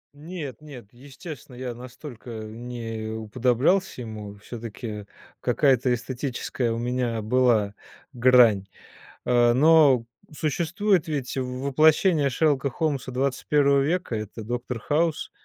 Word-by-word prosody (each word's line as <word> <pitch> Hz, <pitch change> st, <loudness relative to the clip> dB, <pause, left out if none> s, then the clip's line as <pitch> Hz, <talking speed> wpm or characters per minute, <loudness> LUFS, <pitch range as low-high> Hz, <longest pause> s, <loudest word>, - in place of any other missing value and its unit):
Нет, 150 Hz, -4 st, -7 dB
нет, 140 Hz, -7 st, -11 dB
естественно 135 Hz, +1 st, -11 dB
я 125 Hz, -1 st, -5 dB
настолько 125 Hz, 0 st, -10 dB
не 115 Hz, 0 st, -6 dB
уподоблялся 125 Hz, -, +1 dB
ему. 105 Hz, -3 st, -7 dB
Всё-таки 110 Hz, -1 st, -7 dB, 0.3 s
какая-то 130 Hz, -3 st, +2 dB
эстетическая 120 Hz, 0 st, -3 dB
у 115 Hz, -, -2 dB
меня 120 Hz, -1 st, -1 dB
была 110 Hz, -3 st, +2 dB, 0.4 s
грань. 120 Hz, -5 st, +5 dB, 0.6 s
А, 120 Hz, -1 st, +4 dB
но 145 Hz, -4 st, +5 dB, 0.3 s
существует 170 Hz, +5 st, 0 dB
ведь 140 Hz, -5 st, -3 dB
воплощение 140 Hz, +5 st, +2 dB
Шерлока 140 Hz, 0 st, +1 dB
Холмса 140 Hz, -2 st, -2 dB
21 140 Hz, +2 st, +2 dB
века- 160 Hz, -3 st, -1 dB
это 110 Hz, +1 st, -6 dB
Доктор 120 Hz, +1 st, -4 dB
Хаус. 155 Hz, +5 st, 0 dB
125 Hz, 105 wpm, -25 LUFS, 120-145 Hz, 0.6 s, грань